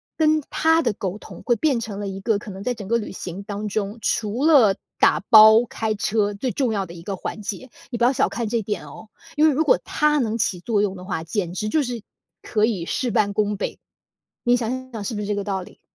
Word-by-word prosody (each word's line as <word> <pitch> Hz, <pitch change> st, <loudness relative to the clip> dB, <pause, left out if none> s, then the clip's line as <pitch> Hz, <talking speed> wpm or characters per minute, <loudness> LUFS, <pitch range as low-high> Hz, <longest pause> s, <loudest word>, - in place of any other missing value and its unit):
跟 310 Hz, -1 st, +2 dB
他 320 Hz, +1 st, +3 dB
的 235 Hz, -5 st, +1 dB
沟 190 Hz, -1 st, -4 dB
通， -, -, -12 dB
会 240 Hz, -, +2 dB
变 270 Hz, 0 st, +1 dB
成 210 Hz, -3 st, -6 dB
了 205 Hz, -, -4 dB
一 195 Hz, 0 st, -6 dB
个 220 Hz, +1 st, +1 dB
可 205 Hz, 0 st, -8 dB
能 190 Hz, +1 st, -8 dB
在 245 Hz, +3 st, -1 dB
整 205 Hz, -4 st, -8 dB
个 235 Hz, +3 st, +2 dB
旅 215 Hz, -, -6 dB
行 185 Hz, 0 st, -7 dB
当 205 Hz, +1 st, -5 dB
中， 205 Hz, +1 st, -3 dB
除 220 Hz, +5 st, -1 dB
了 260 Hz, -11 st, +6 dB, 0.2 s
打 -, -, +4 dB
包、 220 Hz, +1 st, +9 dB
开 220 Hz, -2 st, -2 dB
车， 205 Hz, 0 st, 0 dB
最 250 Hz, +5 st, -2 dB
重 250 Hz, +1 st, 0 dB
要 200 Hz, -2 st, -1 dB
的 170 Hz, -, -11 dB
一 170 Hz, -, -10 dB
个 195 Hz, +3 st, -4 dB
环 215 Hz, -, -6 dB
节。 210 Hz, +5 st, -6 dB, 0.2 s
你 240 Hz, -, -4 dB
不 235 Hz, -, 0 dB
要 250 Hz, +3 st, +4 dB
小 -, -, +2 dB
看 235 Hz, -2 st, -3 dB
这 230 Hz, +1 st, 0 dB
点 210 Hz, 0 st, -4 dB
哦， 220 Hz, -, -12 dB, 0.3 s
因 305 Hz, +1 st, +5 dB
为 -, -, +5 dB
如 295 Hz, +3 st, +1 dB
果 -, -, +4 dB
他 300 Hz, 0 st, +1 dB
能 225 Hz, -3 st, -1 dB
起 200 Hz, -5 st, 0 dB
作 205 Hz, +2 st, 0 dB
用 195 Hz, -2 st, -1 dB
的 180 Hz, -1 st, -10 dB
话， 180 Hz, -4 st, -3 dB
简 175 Hz, +1 st, -3 dB
直 210 Hz, +3 st, -3 dB
就 310 Hz, -, +2 dB
是 245 Hz, -5 st, -4 dB, 0.4 s
可 215 Hz, -1 st, +1 dB
以 200 Hz, -7 st, -2 dB
事 255 Hz, +7 st, -1 dB
半 205 Hz, -2 st, +1 dB
功 210 Hz, 0 st, 0 dB
倍， -, -, -4 dB, 0.7 s
你 245 Hz, 0 st, +4 dB
想 255 Hz, +2 st, -4 dB
想 220 Hz, -3 st, -5 dB
是 210 Hz, +4 st, -3 dB
不 -, -, -3 dB
是 210 Hz, -, -3 dB
这 205 Hz, -, -1 dB
个 200 Hz, -, -2 dB
道 195 Hz, -1 st, -2 dB
理？ -, -, -15 dB
215 Hz, 275 characters per minute, -23 LUFS, 200-245 Hz, 0.7 s, 包